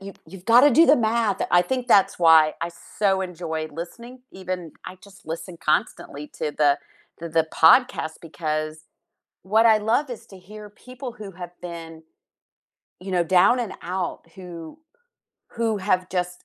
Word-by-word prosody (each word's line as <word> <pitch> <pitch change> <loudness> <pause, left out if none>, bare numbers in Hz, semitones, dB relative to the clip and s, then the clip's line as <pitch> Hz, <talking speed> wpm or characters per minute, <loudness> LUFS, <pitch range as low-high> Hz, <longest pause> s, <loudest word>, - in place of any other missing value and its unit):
you 195 0 -9
you've 190 -1 -13
gotta 245 +5 +6
do 325 +7 +5
the 295 - +6
math, 225 -3 0
I 175 - +5
think 250 +5 -3
that's 195 -5 +4
why 160 -2 +5
I 170 - -3 0.3
so 195 -2 +2
enjoy 165 -3 -5
listening, 235 - -9
even, 185 -3 -6
I 185 - -8
just 200 -1 -18
listen 165 +2 -7
constantly 150 -1 -2
to 150 -2 -2
the 145 -1 +3 0.4
th 165 -1 -8
the 160 -1 +2
podcast 165 -2 +3
because 155 -1 -4 0.6
what 220 +4 +3
I 220 -1 +6
love 235 +7 0
is 235 - -9
to 190 - -14
hear 210 +3 -12
people 250 +3 -10
who 210 -5 -10
have 175 0 -10
been, 165 -2 -9 1.0
you 190 +1 -8
know, 175 -1 +2
down 185 +8 +4
and 220 -5 -4
out, 180 0 -4
who 175 - -10 0.7
who 230 -2 -1
have 185 -1 0
just 180 -1 -4
185 Hz, 160 wpm, -23 LUFS, 165-220 Hz, 1.0 s, gotta